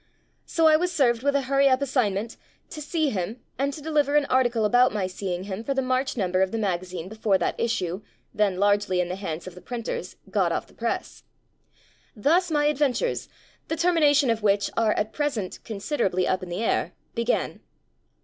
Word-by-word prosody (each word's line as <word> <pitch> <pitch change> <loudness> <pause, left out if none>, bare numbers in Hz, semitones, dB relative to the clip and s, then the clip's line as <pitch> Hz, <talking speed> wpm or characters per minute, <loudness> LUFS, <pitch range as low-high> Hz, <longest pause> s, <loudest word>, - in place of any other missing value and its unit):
So 330 - +1
I 310 -1 +7
was 360 +2 -1
served 240 -8 +2
with 285 +1 +1
a 280 - +2
hurry 275 +1 +3
up 260 -1 +3
as 280 -2 -3
signment 220 -3 0 0.4
to 305 - -7
see 305 -1 0
him 205 +5 -3 0.2
and 280 +1 +1
to 290 +1 -9
deliver 295 -2 +1
an 295 -1 +4
article 240 -4 +2
about 245 +4 +4
my 205 -3 -1
seeing 185 -1 -4
him 195 +2 -5
for 275 +3 -2
the 270 - +2
March 255 +1 0
number 185 -3 +1
of 190 - +3
the 225 - -2
magazine 185 -4 -2
before 215 -1 +1
that - - -2
issue 190 -5 -1 0.3
(then 200 -3 +1
largely 205 -2 +2
in 180 -1 0
the 180 - -2
hands 175 -4 -5
of 185 - -8
the 180 - -12
printers) 240 -2 -5 0.2
got - - +2
off - - -1
the - - -22
press. - - -4 0.9
Thus 335 - +2
my 295 -2 +2
adventures, 295 - 0 0.4
the 320 - -1
termination 300 -6 +4
of 225 -1 -1
which 200 -1 +2
are 225 -2 +3
at 210 +1 -2
present 275 -11 -2
considerably 200 -4 -1
up 185 0 0
in 185 - -7
the 175 +6 -3
air, - - 0 0.2
began. 235 +1 -1
230 Hz, 195 wpm, -25 LUFS, 195-280 Hz, 0.9 s, I